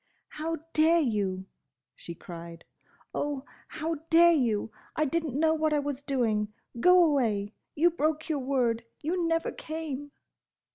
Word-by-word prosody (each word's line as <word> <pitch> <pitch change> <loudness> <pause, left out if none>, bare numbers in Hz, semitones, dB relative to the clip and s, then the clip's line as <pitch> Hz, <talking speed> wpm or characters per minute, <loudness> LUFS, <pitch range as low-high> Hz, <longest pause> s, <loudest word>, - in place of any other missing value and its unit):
"How 325 +2 -3 0.2
dare 320 +2 +5
you!" 200 - -1 0.5
she 170 +5 -9
cried. 170 0 -10 0.5
"Oh! 290 -2 -2 0.2
how 320 +1 -3
dare 340 +1 +7
you! 230 -8 +1 0.2
I 310 - +2
didn't 305 -2 -1
know 320 0 +4
what 310 -1 +1
I 295 - +3
was 285 -1 -3
doing. 230 -7 0 0.3
Go 360 +6 +7
away! 225 -9 +1 0.2
You 345 +4 +4
broke 310 -1 -1
your 310 -3 0
word! 250 -4 0 0.2
You 340 +2 0
never 330 0 0
came!" 295 -3 -6
290 Hz, 140 wpm, -28 LUFS, 230-320 Hz, 0.5 s, dare